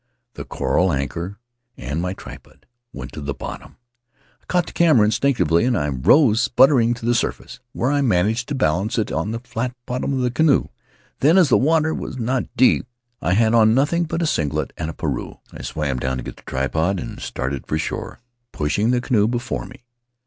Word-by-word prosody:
The - - -8
coral 90 0 0
anchor 85 +7 -3 0.4
and 75 +7 -3
my 90 +1 -2
tripod - - -13 0.3
went 65 -1 -8
to 75 - -8
the 70 -1 -4
bottom; - - -8 0.6
I - - -32
caught 180 -1 +1
the - - -10
camera 155 -11 +4
instinctively 110 - +2
and 75 - -1
rose, 125 -7 +5
sputtering, 125 -3 +4
to 115 - -8
the 120 - +3
surface, 120 +1 -3
where 125 +4 0
I 145 -1 +2
managed 110 0 +1
to 145 - -2
balance 100 -1 0
it 110 - -1
on - - -2
the 115 +1 -4
flat 125 0 -4
bottom 125 +2 -2
of 130 - 0
the 125 -1 0
canoe. 150 +2 +2 0.5
Then, 155 +7 +4
as 175 -6 +5
the - - +5
water 160 +2 +2
was 130 - -5
not 125 +1 -1
deep, 125 0 +4 0.3
and - - -1
I - - +3
had 110 +3 +3
on 110 -1 +5
nothing 165 +6 +2
but 165 +2 -2
a - - +1
singlet 75 - -1
and 80 0 -4
a - - -5
pareu, 70 -6 -4 0.2
I - - -9
swam 70 -5 -3
down 65 +1 -2
to 65 - -5
get - - -8
the - - -18
tripod, 80 +8 -1
and - - -7
started 65 +1 -4
for 75 - -1
shore, 80 +7 -5 0.3
pushing 90 +10 0
the 125 0 +2
canoe 110 -5 +2
before 120 +1 -3
me. - - -15
115 Hz, 200 wpm, -21 LUFS, 80-130 Hz, 0.6 s, rose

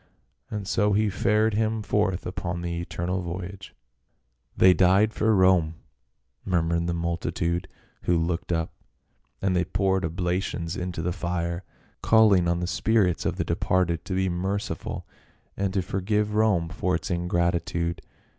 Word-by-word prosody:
And 105 -2 -5
so 105 0 +2
he 105 0 +2
fared 105 +3 +2
him 110 0 0
forth 105 -3 0
upon 90 -1 -4
the 85 -1 -3
eternal 90 +2 -3
voyage. 95 +2 -7 0.4
" - - -42
They 95 0 +7
died 95 +5 +4
for 110 0 +2
Rome 90 -4 +4 0.3
!" - - -51 0.3
murmured 85 -2 0
the 85 - -1
multitude 85 0 -2 0.4
who 90 - +3
looked 85 +1 -2
on, 80 -1 0 0.7
and 95 -1 +2
they 90 - +3
poured 95 +2 0
oblations 85 0 -2
into 90 -2 -4
the 90 +1 -1
fire, 85 0 -3 0.4
calling 105 -6 +5
on 85 0 0
the - - 0
spirits 95 -1 +1
of - - -1
the - - -2
departed 85 -3 0
to 95 - -3
be 95 0 +1
merci 95 +3 -2
ful, - - -6 0.5
and 100 -1 -1
to 95 - +1
forgive 105 +3 -1
Rome 105 -6 +2
for 90 +1 -1
its 85 - -4
ingratitude. 85 -1 0
90 Hz, 155 wpm, -26 LUFS, 85-100 Hz, 0.7 s, They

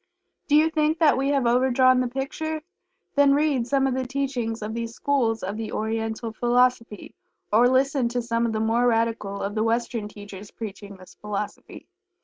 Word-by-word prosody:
Do 295 - +3
you 315 +2 +4
think 310 0 +1
that 315 -3 +4
we 270 +2 0
have 275 -3 +1
overdrawn 255 +1 +4
the 255 - +1
picture? 300 +5 -4 0.5
Then 280 -1 +4
read 285 -5 +1
some 270 0 +2
of 265 - +1
the 260 0 -2
teachings 250 -5 -3
of 215 +1 -4
these 230 0 -5
schools 240 -6 0
of 195 +3 -4
the 225 -1 -5
Oriental 225 +1 -3
Philosophy, 240 -2 0 0.4
or 235 +3 +6
listen 260 -1 +2
to 245 +1 -2
some 230 0 0
of - - -2
the 220 - -2
more 230 +3 +2
radical 225 -4 0
of 200 +1 -3
the 215 - -1
Western 230 -1 -1
teachers 205 -1 -11
preaching 200 -2 -8
this 185 0 -15
philosophy. 210 0 -6
235 Hz, 180 wpm, -24 LUFS, 220-270 Hz, 0.5 s, or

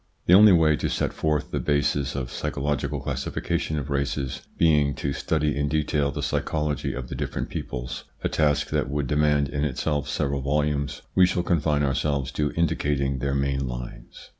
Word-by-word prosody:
The 90 - +5
only 105 +2 +9
way 80 -4 +4
to - - -1
set - - -1
forth 75 -2 -1
the - - -1
bases 70 -1 0
of 70 -2 -2
a - - -11
psycho - - -3
logical 75 -1 -1
classification 80 - -2
of 70 0 -4
races 70 -1 -2 0.2
being 75 -4 +3
to 70 - -2
study 75 0 0
in 70 0 0
detail 75 -1 +1
the - - -4
psychology 75 -3 -1
of 65 -2 -5
the - - -7
different - - -3
peoples, 60 0 -5 0.2
a - - +2
task 75 -1 +1
that - - 0
would 70 0 -1
demand 75 +1 +2
in 70 0 -2
itself 75 +1 -1
several 70 0 -1
volumes, 70 0 -1
we 90 -1 +6
shall 90 -1 0
confine 75 -4 +1
ourselves 70 -1 0
to 75 +1 -1
indicating 70 -5 0
their 70 +1 -1
main 70 -1 0
lines. - - -8
70 Hz, 185 wpm, -25 LUFS, 70-75 Hz, 0.2 s, only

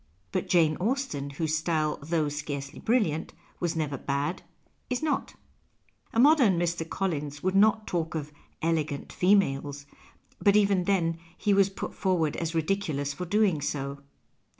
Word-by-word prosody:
But - - -2
Jane 160 -3 +4
Austen, 225 - -1
whose 155 +2 -1
style, 155 -1 0
though 155 +1 0
scarcely 145 -1 -5
brilliant, 210 -10 0 0.3
was 170 -1 -1
never 145 -4 -2
bad, 140 +5 -2 0.5
is 250 +3 -2
not. 310 - -1 0.8
A 225 - 0
modern 260 - +6
Mr. 170 -1 -1
Collins 150 -6 -3
would 185 0 +1
not 215 +2 +4
talk 165 -2 -2
of 150 -1 -4 0.2
" - - -39
elegant 155 -3 -1
females 145 -7 +2 0.2
" - - -26
— - - -34
but 200 -1 +5
even 200 -3 +3
then 165 -4 +1 0.2
he 205 - +2
was 195 0 +4
put 195 - -6
forward 175 -6 0
as 165 0 -3
ridiculous 160 -5 -1
for 180 +5 -5
doing 200 -5 +2
so. 140 -1 -3
165 Hz, 155 wpm, -28 LUFS, 150-195 Hz, 0.8 s, modern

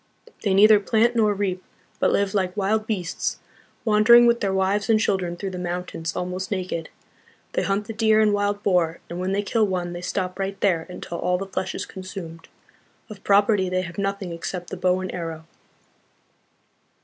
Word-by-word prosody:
They 195 -3 +1
neither 210 +1 +7
plant 225 +3 +2
nor 215 -2 +3
reap, 190 -2 -2 0.4
but - - +3
live 200 -1 +1
like 185 -1 -1
wild 215 +2 0
beasts, 185 -6 -2 0.5
wandering 225 +2 +7
with 235 0 +4
their 195 - +1
wives 190 +3 0
and 220 -1 +5
children 185 -5 0
through 195 +1 -4
the 180 - -6
mountains, 175 -1 -4
almost 180 +1 -3
naked. 185 -4 -3 0.6
They - - +1
hunt 200 +1 -1
the 225 - -6
deer 220 0 +3
and 215 -1 +4
wild 205 0 0
boar, 175 -4 +1
and 175 - -4
when 185 +1 -1
they 200 +1 0
kill 220 0 +1
one 180 -2 -2
they 175 - -6
stop 185 +1 -3
right 195 0 -3
there 170 -5 +1
until 175 -1 -7
all 180 0 +1
the 195 - -4
flesh 190 -1 -4
is - - -4
consumed. 185 -4 -9 0.6
Of 200 -2 -11
property 200 -1 +3
they 185 0 0
have 170 +1 -7
nothing 195 -2 -2
except 175 +1 -6
the - - -3
bow 180 +1 +1
and 185 - -5
arrow." 165 -2 -5
190 Hz, 185 wpm, -24 LUFS, 180-205 Hz, 0.6 s, neither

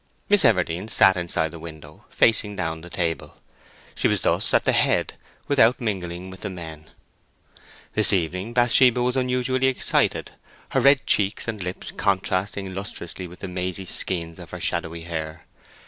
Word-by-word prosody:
Miss 205 -3 +7
Everdene 90 -5 +2
sat 95 -1 +5
inside 85 -3 -2
the 85 - -7
window, 80 -2 -11
facing 105 -2 +2
down 80 -3 -3
the 85 - -11
table. 85 -2 -3 0.6
She - - +1
was - - 0
thus - - 0
at - - +2
the - - +4
head - - +1 0.3
without 125 -3 +4
mingling 95 -5 -4
with 95 - -12
the 100 - -4
men. 80 -4 -9 1.0
This 110 - +2
evening 90 +3 -1
Bathsheba 125 +1 +4
was 125 +1 0
unusually 130 0 +1
excited, 130 - +1 0.4
her 135 - +1
red 140 +1 +5
cheeks 100 +2 0
and 110 -3 -4
lips 90 0 -5
contrasting 95 0 -1
lustrously 95 -2 -6
with 90 +1 -14
the 95 - -5
mazy 90 +1 -4
skeins 85 -2 0
of - - -10
her - - -7
shadowy 85 +1 -1
hair. 80 -1 -6
95 Hz, 160 wpm, -23 LUFS, 85-115 Hz, 1.0 s, Miss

